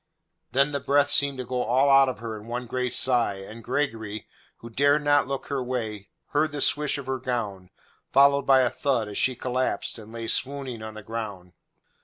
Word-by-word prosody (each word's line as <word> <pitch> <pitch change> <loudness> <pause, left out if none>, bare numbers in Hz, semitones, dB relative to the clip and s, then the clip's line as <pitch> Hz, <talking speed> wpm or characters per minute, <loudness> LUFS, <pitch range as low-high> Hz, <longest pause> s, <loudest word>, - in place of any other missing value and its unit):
Then 140 +2 +2
the 140 - -1
breath 145 +1 +2
seemed 140 -1 +2
to 130 - -5
go 125 +1 -2
all 130 +5 +2
out 135 -1 +6
of 125 - -5
her 115 0 -6
in 105 +1 -10
one 120 +1 -4
great 125 +1 -2
sigh, 120 -5 +2
and 105 +4 -10
Gregory, 110 -6 -3 0.3
who 115 - -11
dared 145 +4 +3
not 145 -2 +3
look 135 0 -4
her 140 -2 -1
way, 110 -6 -4 0.2
heard 155 +1 +1
the 145 - -5
swish 150 +1 +2
of 140 - -7
her 130 0 -2
gown, 105 -7 -4 0.4
followed 140 +1 +4
by 135 -1 +6
a 125 -1 +2
thud 130 -5 0
as 105 - -4
she 130 - +2
collapsed 125 -1 -2
and 110 0 -12
lay 115 0 -6
swooning 130 -2 -1
on 110 0 -8
the 110 - -9
ground. 105 -5 -6
125 Hz, 205 wpm, -25 LUFS, 110-140 Hz, 0.4 s, out